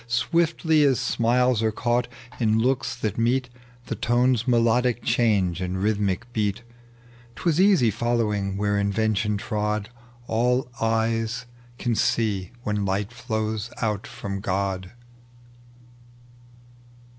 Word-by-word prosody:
Swiftly 160 Hz, +5 st, +2 dB
as 135 Hz, -4 st, +3 dB
smiles 120 Hz, 0 st, +2 dB
are 110 Hz, -1 st, +2 dB
caught 120 Hz, +2 st, 0 dB, 0.3 s
in 110 Hz, -2 st, +2 dB
looks 130 Hz, +3 st, 0 dB
that 110 Hz, -3 st, -3 dB
meet, 125 Hz, +2 st, +1 dB, 0.4 s
The -, -, -3 dB
tone's 120 Hz, 0 st, +1 dB
melodic 120 Hz, 0 st, +2 dB
change 100 Hz, -7 st, +1 dB
and 90 Hz, 0 st, -2 dB
rhythmic 100 Hz, +1 st, 0 dB
beat: 105 Hz, +1 st, -1 dB, 0.7 s
'Twas 170 Hz, -1 st, +1 dB
easy 185 Hz, -, +5 dB
following 105 Hz, -4 st, -1 dB
where 105 Hz, 0 st, +1 dB
invention 105 Hz, +1 st, 0 dB
trod 105 Hz, +1 st, -2 dB, 0.2 s
— 120 Hz, 0 st, -26 dB
All 125 Hz, +2 st, +1 dB
eyes 115 Hz, +1 st, 0 dB, 0.3 s
can 120 Hz, -3 st, -1 dB
see 105 Hz, -5 st, 0 dB
when 105 Hz, -2 st, -1 dB
light 100 Hz, +3 st, -1 dB
flows 110 Hz, -2 st, -3 dB
out 105 Hz, -4 st, -1 dB
from 100 Hz, -1 st, -5 dB
God. 95 Hz, -1 st, -2 dB
115 Hz, 115 wpm, -24 LUFS, 105-120 Hz, 0.7 s, easy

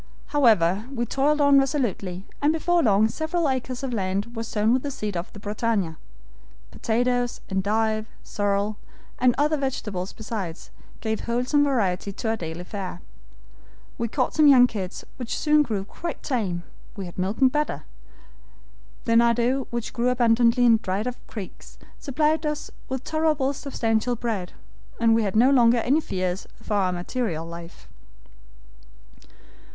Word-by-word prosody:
"However, 215 Hz, -, +3 dB
we 240 Hz, -3 st, -2 dB
toiled 285 Hz, +5 st, +1 dB
on 285 Hz, -1 st, +6 dB
resolutely, 220 Hz, -, -1 dB, 0.2 s
and 290 Hz, +1 st, +4 dB
before 340 Hz, +2 st, +2 dB
long 215 Hz, -4 st, +4 dB
several 315 Hz, +7 st, -1 dB
acres 260 Hz, -1 st, -2 dB
of 260 Hz, -2 st, -2 dB
land 200 Hz, +3 st, -2 dB
were 225 Hz, -, -3 dB
sown 220 Hz, 0 st, +1 dB
with 260 Hz, -, +2 dB
the 285 Hz, -, -3 dB
seed 215 Hz, -7 st, -4 dB
off 170 Hz, +3 st, -4 dB
the 205 Hz, -, -11 dB
BRITANNIA; 205 Hz, -5 st, -1 dB, 0.8 s
potatoes, 245 Hz, +1 st, 0 dB
endive, 215 Hz, +3 st, 0 dB, 0.2 s
sorrel, 205 Hz, +1 st, -1 dB, 0.4 s
and 250 Hz, -1 st, +4 dB
other 300 Hz, +2 st, +2 dB
vegetables 210 Hz, -9 st, -3 dB
besides, 205 Hz, -6 st, -6 dB, 0.3 s
gave 220 Hz, -1 st, -1 dB
wholesome 250 Hz, +5 st, +2 dB
variety 200 Hz, -9 st, 0 dB
to 220 Hz, -, -3 dB
our 225 Hz, -, +1 dB
daily 170 Hz, -3 st, -6 dB
fare. 185 Hz, -2 st, -6 dB, 1.0 s
We 235 Hz, -, 0 dB
caught 255 Hz, +3 st, -1 dB
some 305 Hz, -2 st, +5 dB
young 260 Hz, -3 st, +8 dB
kids, 195 Hz, -6 st, -5 dB
which 245 Hz, -3 st, -4 dB
soon 300 Hz, -1 st, +4 dB
grew 210 Hz, -9 st, -2 dB
quite 340 Hz, +10 st, -6 dB
tame. 195 Hz, -, -1 dB, 0.3 s
We 195 Hz, -3 st, -5 dB
had 175 Hz, +1 st, -9 dB
milk 190 Hz, +4 st, -1 dB
and 260 Hz, -1 st, +5 dB
butter. 300 Hz, +1 st, -1 dB, 1.2 s
The 230 Hz, -, +1 dB
nardou, 235 Hz, +3 st, +3 dB
which 235 Hz, -1 st, -4 dB
grew 245 Hz, +1 st, +1 dB
abundantly 240 Hz, 0 st, +4 dB
in 230 Hz, -2 st, +6 dB
dried 195 Hz, +1 st, -2 dB
up 250 Hz, 0 st, -3 dB
creeks, 205 Hz, -5 st, -9 dB, 0.2 s
supplied 305 Hz, +3 st, +1 dB
us 300 Hz, -1 st, -3 dB, 0.2 s
with 260 Hz, 0 st, -3 dB
tolerably 310 Hz, -4 st, +1 dB
substantial 240 Hz, -4 st, -1 dB
bread, 215 Hz, -6 st, -3 dB, 0.5 s
and 230 Hz, -1 st, +4 dB
we 225 Hz, -, +3 dB
had 200 Hz, -2 st, -1 dB
no 245 Hz, +5 st, +5 dB
longer 240 Hz, -3 st, +5 dB
any 265 Hz, +7 st, +2 dB
fears 185 Hz, -6 st, -3 dB
for 225 Hz, -1 st, -5 dB
our 195 Hz, -3 st, +2 dB
material 175 Hz, -2 st, -3 dB
life. 170 Hz, 0 st, -10 dB
230 Hz, 150 wpm, -25 LUFS, 200-265 Hz, 1.2 s, young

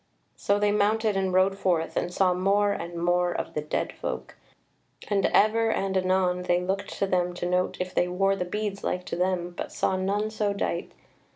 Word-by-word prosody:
So 200 Hz, -, +1 dB
they 205 Hz, 0 st, +2 dB
mounted 210 Hz, +1 st, +2 dB
and 190 Hz, -1 st, 0 dB
rode 190 Hz, +1 st, +2 dB
forth, 170 Hz, -3 st, 0 dB
and 175 Hz, -, -1 dB
saw 185 Hz, 0 st, +2 dB
more 200 Hz, +3 st, +2 dB
and 170 Hz, -2 st, -5 dB
more 175 Hz, +1 st, +2 dB
of -, -, -4 dB
the 150 Hz, -, -1 dB
dead 150 Hz, -, -2 dB
folk; 65 Hz, +1 st, -5 dB, 0.7 s
and 200 Hz, -2 st, +2 dB
ever 225 Hz, +2 st, +3 dB
and 195 Hz, -3 st, -1 dB
anon 185 Hz, -1 st, +1 dB
they 175 Hz, -1 st, +1 dB
looked 190 Hz, +2 st, -3 dB
to -, -, +1 dB
them 180 Hz, -2 st, 0 dB
to 175 Hz, -, -4 dB
note 180 Hz, +1 st, 0 dB
if 180 Hz, 0 st, -3 dB
they 175 Hz, -, +2 dB
wore 195 Hz, +2 st, +1 dB
the 180 Hz, -, -2 dB
beads 200 Hz, +2 st, -4 dB
like 180 Hz, 0 st, -2 dB
to -, -, -4 dB
them 180 Hz, -1 st, -1 dB
but -, -, -5 dB
saw 190 Hz, -, 0 dB
none 205 Hz, +3 st, -1 dB
so 210 Hz, -2 st, 0 dB
dight. 175 Hz, -3 st, -3 dB
185 Hz, 200 wpm, -26 LUFS, 180-200 Hz, 0.7 s, ever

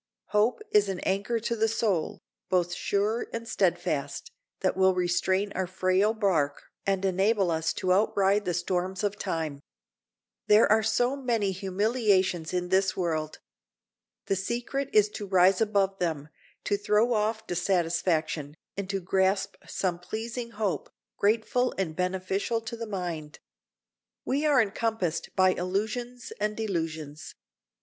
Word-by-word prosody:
Hope 215 Hz, -, +2 dB
is 205 Hz, -1 st, +4 dB
an 190 Hz, -2 st, -3 dB
anchor 200 Hz, +5 st, 0 dB
to 235 Hz, +1 st, -1 dB
the 225 Hz, 0 st, +2 dB
soul, 215 Hz, -7 st, 0 dB, 0.3 s
both 180 Hz, -1 st, +1 dB
sure 205 Hz, +5 st, 0 dB
and 230 Hz, 0 st, -5 dB
steadfast, 465 Hz, -, -1 dB, 0.3 s
that -, -, +1 dB
will 190 Hz, 0 st, +4 dB
restrain 185 Hz, +3 st, +1 dB
our 190 Hz, -1 st, -1 dB
frail 185 Hz, +4 st, +2 dB
bark 165 Hz, -10 st, +1 dB, 0.2 s
and 195 Hz, -1 st, +1 dB
enable 195 Hz, 0 st, +2 dB
us 160 Hz, 0 st, 0 dB
to 185 Hz, +1 st, +1 dB
outride 200 Hz, 0 st, +2 dB
the 175 Hz, -1 st, 0 dB
storms 185 Hz, +2 st, -1 dB
of 205 Hz, 0 st, 0 dB
time. 160 Hz, -6 st, -3 dB, 0.9 s
There 210 Hz, +1 st, +7 dB
are 220 Hz, +1 st, +5 dB
so 245 Hz, +4 st, +1 dB
many 235 Hz, -7 st, 0 dB
humiliations 190 Hz, -3 st, +1 dB
in 180 Hz, -1 st, -2 dB
this 190 Hz, 0 st, +2 dB
world! 155 Hz, -4 st, -1 dB, 0.9 s
The 195 Hz, -, +1 dB
secret 240 Hz, +7 st, -2 dB
is 210 Hz, -1 st, +5 dB
to 205 Hz, -1 st, -6 dB
rise 185 Hz, +1 st, +4 dB
above 200 Hz, -3 st, +1 dB
them, 155 Hz, -4 st, -2 dB, 0.3 s
to 205 Hz, -, +1 dB
throw 210 Hz, +4 st, +2 dB
off 220 Hz, 0 st, 0 dB
dissatisfaction, 170 Hz, -4 st, 0 dB, 0.2 s
and 200 Hz, -1 st, -4 dB
to 195 Hz, -1 st, -1 dB
grasp 190 Hz, +2 st, +1 dB
some 180 Hz, -2 st, -2 dB
pleasing 230 Hz, +6 st, -5 dB
hope, 210 Hz, -4 st, -2 dB, 0.3 s
grateful 230 Hz, +4 st, +1 dB
and 175 Hz, -5 st, -2 dB
beneficial 190 Hz, +5 st, -1 dB
to 225 Hz, +1 st, -6 dB
the 230 Hz, 0 st, -6 dB
mind. 170 Hz, -7 st, -5 dB, 0.9 s
We 285 Hz, +4 st, +1 dB
are 285 Hz, -3 st, +5 dB
encompassed 205 Hz, -6 st, -1 dB
by 185 Hz, 0 st, +5 dB
illusions 220 Hz, +7 st, -3 dB
and 210 Hz, 0 st, -1 dB
delusions. 160 Hz, -7 st, -4 dB
195 Hz, 140 wpm, -28 LUFS, 180-220 Hz, 0.9 s, There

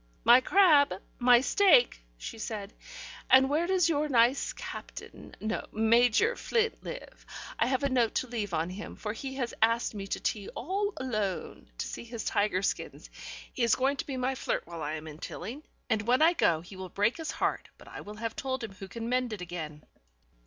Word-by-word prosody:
"My 240 Hz, +2 st, +7 dB
crab, 290 Hz, -, +5 dB, 0.2 s
my 245 Hz, 0 st, +6 dB
steak," 310 Hz, -, +4 dB, 0.2 s
she 220 Hz, -, -8 dB
said. 210 Hz, -2 st, -5 dB, 0.6 s
"And 265 Hz, +1 st, +6 dB
where 325 Hz, +4 st, +1 dB
does 370 Hz, -2 st, +3 dB
your 305 Hz, -2 st, 0 dB
nice 245 Hz, +1 st, +3 dB
Captain, -, -, -9 dB
no, 220 Hz, +1 st, -3 dB
Major 235 Hz, -, +3 dB
Flint 455 Hz, -1 st, -1 dB
live? -, -, -8 dB, 0.4 s
I 230 Hz, -, +3 dB
have 260 Hz, +2 st, 0 dB
a 280 Hz, -, +2 dB
note 245 Hz, -4 st, +1 dB
to 255 Hz, -, 0 dB
leave 220 Hz, -5 st, -3 dB
on 165 Hz, +1 st, -1 dB
him, 200 Hz, +3 st, -7 dB
for 210 Hz, 0 st, -4 dB
he 265 Hz, +3 st, -6 dB
has 250 Hz, -3 st, -3 dB
asked 230 Hz, +1 st, +2 dB
me 200 Hz, -2 st, -6 dB
to -, -, -3 dB
tea 205 Hz, -3 st, -2 dB
all 395 Hz, -, -1 dB
alone, 215 Hz, -7 st, -3 dB
to -, -, -3 dB
see -, -, -6 dB
his 235 Hz, -1 st, -6 dB
tiger 200 Hz, -2 st, +1 dB
skins. -, -, -3 dB, 0.4 s
He -, -, -4 dB
is 235 Hz, -1 st, +4 dB
going 270 Hz, +2 st, +1 dB
to -, -, -4 dB
be 270 Hz, -2 st, -4 dB
my 255 Hz, +1 st, 0 dB
flirt 260 Hz, -, -2 dB
while 170 Hz, -1 st, -8 dB
I 150 Hz, 0 st, -3 dB
am 155 Hz, 0 st, -7 dB
in 155 Hz, 0 st, -10 dB
Tilling, 250 Hz, -, -6 dB, 0.3 s
and 220 Hz, -2 st, -1 dB
when 255 Hz, +5 st, +4 dB
I 335 Hz, +2 st, +6 dB
go 165 Hz, -, +2 dB
he 175 Hz, +3 st, -12 dB
will 185 Hz, -1 st, -7 dB
break 205 Hz, +6 st, +1 dB
his 320 Hz, -2 st, -5 dB
heart, -, -, -2 dB
but -, -, -16 dB
I -, -, -8 dB
will 210 Hz, +1 st, -9 dB
have 225 Hz, +1 st, -4 dB
told 260 Hz, -2 st, -3 dB
him 220 Hz, -, -5 dB
who 195 Hz, 0 st, -10 dB
can 230 Hz, +4 st, -6 dB
mend 250 Hz, -1 st, 0 dB
it 205 Hz, -, -6 dB
again." 160 Hz, -4 st, -6 dB
235 Hz, 205 wpm, -29 LUFS, 205-270 Hz, 0.6 s, My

